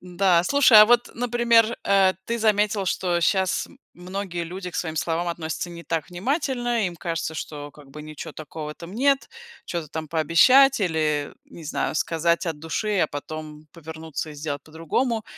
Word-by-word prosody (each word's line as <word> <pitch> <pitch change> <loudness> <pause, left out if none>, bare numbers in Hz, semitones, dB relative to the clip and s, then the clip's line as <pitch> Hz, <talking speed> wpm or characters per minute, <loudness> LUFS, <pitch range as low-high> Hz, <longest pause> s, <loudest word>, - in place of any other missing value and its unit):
Да, 180 -1 +2
слушай, 265 0 +6
а - - +10
вот, 240 +1 +3
например, 235 -1 +2
э, 195 -1 +4
ты 235 0 -2
заметил, 210 -2 +2
что 175 -1 0
щас 190 +1 +1 0.3
многие 180 -1 -5
люди 180 +2 -7
к - - -19
своим 160 -3 -3
словам 165 +3 -1
относятся 170 0 -4
не 170 0 -10
так 165 -1 -3
внимательно, 240 - -1
им 175 -1 -6
кажется, 165 -1 -3
что 145 -2 -6
как 145 -1 -17
бы 150 +2 -9
ничего 155 -1 -8
такого 150 0 -7
там 170 +3 -11
нет, 275 +5 +1 0.4
чё-то 170 -3 -4
там 160 +1 -5
пообещать 220 - +5
или, 155 -5 0
не 170 - -12
знаю, 150 - -2
сказать 170 +2 0
от 160 -3 -3
души, 195 +7 -2
а 155 - +3
потом 155 +1 -8
повернуться 160 -1 -7
и - - -10
сделать 145 -1 -5
по-другому. 215 - -2
170 Hz, 170 wpm, -24 LUFS, 155-210 Hz, 0.4 s, а